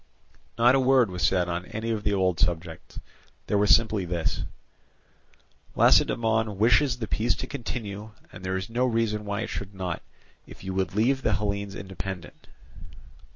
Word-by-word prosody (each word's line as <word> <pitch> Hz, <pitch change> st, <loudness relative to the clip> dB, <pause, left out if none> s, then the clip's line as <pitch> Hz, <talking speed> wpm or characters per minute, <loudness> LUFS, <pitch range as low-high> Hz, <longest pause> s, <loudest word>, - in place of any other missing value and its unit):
Not 120 Hz, +2 st, +5 dB
a 135 Hz, -, +4 dB
word 130 Hz, -5 st, +4 dB
was 90 Hz, -1 st, -5 dB
said 90 Hz, -2 st, +2 dB
on 85 Hz, +1 st, -3 dB
any 110 Hz, +5 st, -3 dB
of 110 Hz, -2 st, -1 dB
the 105 Hz, -, 0 dB
old 95 Hz, -4 st, +1 dB
subjects; 80 Hz, -1 st, -2 dB, 0.5 s
there 105 Hz, -, +1 dB
was 105 Hz, 0 st, +2 dB
simply 110 Hz, +1 st, +4 dB
this: 85 Hz, -2 st, -2 dB, 1.3 s
"Lacedaemon 110 Hz, -3 st, +3 dB
wishes 125 Hz, +4 st, +4 dB
the 115 Hz, -3 st, -4 dB
peace 115 Hz, +3 st, +1 dB
to -, -, -5 dB
continue, 110 Hz, -5 st, -5 dB, 0.2 s
and 90 Hz, -, -11 dB
there 95 Hz, 0 st, -1 dB
is 95 Hz, +1 st, -4 dB
no 120 Hz, +2 st, 0 dB
reason 115 Hz, -3 st, 0 dB
why 100 Hz, +1 st, -2 dB
it -, -, -4 dB
should 100 Hz, 0 st, -6 dB
not, 90 Hz, -3 st, -3 dB, 0.5 s
if -, -, -13 dB
you 95 Hz, 0 st, -4 dB
would 95 Hz, 0 st, -1 dB
leave 130 Hz, +5 st, +2 dB
the 110 Hz, -, +1 dB
Hellenes 100 Hz, -1 st, -2 dB
independent." 95 Hz, -4 st, -7 dB
105 Hz, 165 wpm, -26 LUFS, 95-115 Hz, 1.3 s, Not